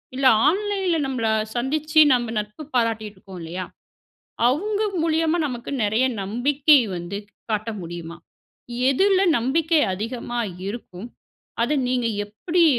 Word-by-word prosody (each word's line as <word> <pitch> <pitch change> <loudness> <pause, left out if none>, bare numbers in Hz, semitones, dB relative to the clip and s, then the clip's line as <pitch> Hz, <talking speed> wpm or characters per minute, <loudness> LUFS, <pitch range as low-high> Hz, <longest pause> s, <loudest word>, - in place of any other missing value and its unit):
இல்ல 265 0 +3 0.2
ஆன்லைன்ல 385 0 +1
நம்பள 255 -4 -1 0.3
சந்திச்சு 305 +5 +1
நம்ப 240 -2 0
நட்பு 210 +8 -7
பாராட்டிட்டு 225 -3 0
இருக்கோம் 190 -1 -11
இல்லயா, 175 +3 -5 0.8
அவங்க 405 - 0 0.2
மூலியமா 325 +1 +1
நமக்கு 245 -2 -6
நிறைய 220 +5 +2 0.2
நம்பிக்கை 275 +8 +3 0.2
வந்து 175 +3 -5 0.3
காட்ட 215 +1 -1
முடியுமா? 170 0 -7 0.7
எதுல 380 +7 +3 0.2
நம்பிக்கை 310 +6 +2
அதிகமா 235 +4 -4 0.3
இருக்கும். 205 -1 -7 0.5
அத 235 - +1 0.2
நீங்க 250 -2 +1 0.2
எப்படி 330 - 0
245 Hz, 115 wpm, -23 LUFS, 210-310 Hz, 0.8 s, இல்ல